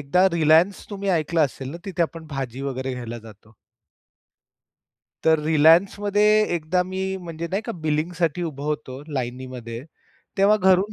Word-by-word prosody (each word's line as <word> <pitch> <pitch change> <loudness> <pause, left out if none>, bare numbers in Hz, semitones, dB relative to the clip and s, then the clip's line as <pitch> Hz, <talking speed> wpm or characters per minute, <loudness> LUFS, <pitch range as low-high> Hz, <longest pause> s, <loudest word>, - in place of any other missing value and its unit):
एकदा 160 +7 +3
रिलायन्स 165 +4 +3
तुम्ही 200 -1 -4
ऐकलं 160 +2 -1
असेल 135 -1 -6
ना, 165 - -6
तिथे 185 -3 -1
आपण 165 -1 -4
भाजी 135 -4 -5
वगैरे 130 +1 -4
घ्यायला 120 -1 -6
जातो. 110 -1 -16 1.7
तर 160 0 +5
रिलायन्समध्ये 185 +7 +4 0.3
एकदा 170 +2 0
मी 190 +1 -3
म्हणजे 170 -1 -6
नाही 195 +3 -1
का, 230 - -4
बिलिंगसाठी 165 0 -1
उभा 145 -4 -5
होतो 145 -3 -4
लाईनीमध्ये 125 -2 -5 0.6
तेव्हा 200 +2 +5
घरून 190 +1 +3
160 Hz, 135 wpm, -23 LUFS, 135-185 Hz, 1.7 s, तर